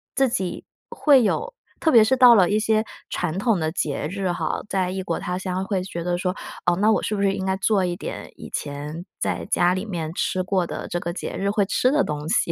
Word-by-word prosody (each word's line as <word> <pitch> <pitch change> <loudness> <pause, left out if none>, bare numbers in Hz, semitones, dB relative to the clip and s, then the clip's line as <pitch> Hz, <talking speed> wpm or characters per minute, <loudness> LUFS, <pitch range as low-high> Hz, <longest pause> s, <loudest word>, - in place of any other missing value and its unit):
自 270 - +3
己 190 -8 -3 0.2
会 280 -5 +4
有 470 - -1 0.3
特 320 - +2
别 230 -2 +8
是 260 +5 +2
到 250 -2 +8
了 185 -5 +5
一 210 - +2
些 215 0 +2 0.3
传 175 -1 -2
统 225 -1 +2
的 160 -2 -1
节 150 -4 -2
日 195 -1 -2
哈， 165 -2 -2
在 190 -3 0
异 190 +1 -3
国 170 -3 -2
他 180 0 -3
乡 185 0 -3
会 195 -2 -1
觉 175 -2 -5
得 175 0 0
说， 180 0 -1 0.3
哦， 175 - +3
那 210 +4 +3
我 215 - +2
是 210 - -2
不 200 - -2
是 195 -1 +2
应 190 - -3
该 190 0 +1
做 190 0 +2
一 175 -1 -2
点 - - -7
以 - - -10
前 150 +4 -5
在 - - -2
家 175 +1 +3
里 185 +3 -3
面 165 -6 -4
吃 185 +1 -1
过 185 -2 0
的 - - -6
这 175 - -1
个 170 0 -4
节 - - -5
日 200 - 0
会 205 -1 +2
吃 250 +6 +2
的 290 +2 +3
东 150 0 -4
西， 170 - +1
190 Hz, 265 characters per minute, -23 LUFS, 175-210 Hz, 0.3 s, 别